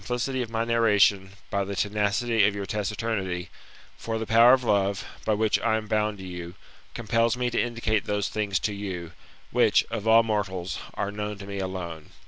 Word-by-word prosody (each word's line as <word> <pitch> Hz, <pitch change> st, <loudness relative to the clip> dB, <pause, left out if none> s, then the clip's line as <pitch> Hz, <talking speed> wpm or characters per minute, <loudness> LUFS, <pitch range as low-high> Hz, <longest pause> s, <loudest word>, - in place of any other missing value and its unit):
4j 125 Hz, -, -4 dB
sin^licity 130 Hz, +1 st, -1 dB
of 120 Hz, -, -4 dB
my 115 Hz, 0 st, -1 dB
narration 105 Hz, -4 st, +3 dB, 0.2 s
by 100 Hz, 0 st, +1 dB
the 100 Hz, +1 st, -5 dB
tenacity 105 Hz, +3 st, +1 dB
of 105 Hz, -, -1 dB
your 100 Hz, -1 st, -4 dB
taciturnity; 105 Hz, -4 st, -3 dB, 0.5 s
for 115 Hz, -1 st, -3 dB
the 110 Hz, -, -3 dB
power 115 Hz, +3 st, +7 dB
of 130 Hz, -1 st, +3 dB
love, 100 Hz, -3 st, +1 dB, 0.2 s
by 110 Hz, -, +2 dB
which 110 Hz, +1 st, +2 dB
I 110 Hz, -1 st, +1 dB
am 110 Hz, -, -5 dB
bound 105 Hz, 0 st, 0 dB
to 95 Hz, -, -9 dB
you, 90 Hz, -1 st, -7 dB, 0.4 s
compels 115 Hz, +1 st, +1 dB
me 125 Hz, -1 st, -1 dB
to -, -, +1 dB
indicate 115 Hz, -3 st, -1 dB
those 105 Hz, -1 st, -1 dB
things 105 Hz, -3 st, -1 dB
to 105 Hz, -, -1 dB
you, 95 Hz, -4 st, -5 dB, 0.4 s
which, -, -, +4 dB
of 110 Hz, -2 st, -3 dB
all 115 Hz, +1 st, +7 dB
mortals, 95 Hz, -5 st, -2 dB, 0.2 s
are 100 Hz, -, -2 dB
known 105 Hz, 0 st, -4 dB
to 100 Hz, -, -9 dB
me 100 Hz, 0 st, -5 dB
alone. 90 Hz, -4 st, -5 dB
105 Hz, 195 wpm, -26 LUFS, 100-115 Hz, 0.5 s, power